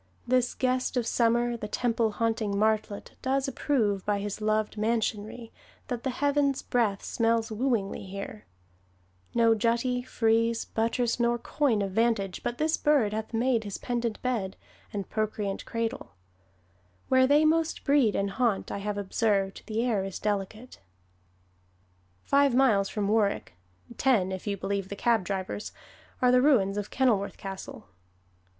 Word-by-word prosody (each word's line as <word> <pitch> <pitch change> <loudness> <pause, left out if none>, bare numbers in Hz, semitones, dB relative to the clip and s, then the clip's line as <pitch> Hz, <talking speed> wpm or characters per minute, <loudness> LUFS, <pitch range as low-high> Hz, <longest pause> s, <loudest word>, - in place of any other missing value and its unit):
This 250 0 +2
guest 255 0 0
of 240 - +1
Summer, 240 +1 +2
The 215 -2 -5
temple 230 -1 0
haunting 220 -2 -1
martlet, 215 -1 0
does 270 +1 0
approve, 225 -8 0
By 205 -1 0
his 205 +1 -4
loved 215 0 0
mansionry, 220 +1 -2 0.4
that 245 -2 -3
the 265 - -2
heaven's 280 +1 +1
breath 220 -5 0
Smells 230 -1 0
wooingly 215 -4 -1
here: 200 +2 -7 0.9
no 230 -1 +5
jutty, 235 +3 +1
frieze, 230 -1 +1
Buttress, 230 +2 0
nor 240 0 +2
coign 240 -4 0
of 195 - -3
vantage, 210 -3 0
but 240 - -3
this 315 +1 +1
bird 275 -9 +2
Hath 220 0 -4
made 235 0 +1
his 205 -2 -5
pendent 235 -2 -2
bed, 220 -7 -2 0.3
and 200 -2 -4
procreant 210 -2 -2
cradle; 230 - -4 0.9
Where 260 0 +4
they 295 +3 +5
most 320 +1 +1
breed 275 -7 +3
and 200 0 0
haunt, 225 -1 0
I - - -3
have 205 0 -3
observed, 200 -1 0
The 225 +2 -1
air 215 -6 +1
is 195 -1 -5
delicate." 210 +4 -3 1.4
Five 280 -2 +3
miles 220 -7 +4
from 205 -2 -2
Warwick 210 - +1 0.5
(ten, 220 -9 +3
if 190 +2 -6
you 200 -1 -1
believe 195 0 -3
the 200 - -5
cab 230 -1 +2
drivers) 190 +2 -4 0.5
are 250 - +6
the 250 0 +5
ruins 225 -9 +3
of 205 -1 -3
Kenilworth 220 -7 +1
Castle. 195 -1 -8
225 Hz, 145 wpm, -28 LUFS, 205-245 Hz, 1.4 s, are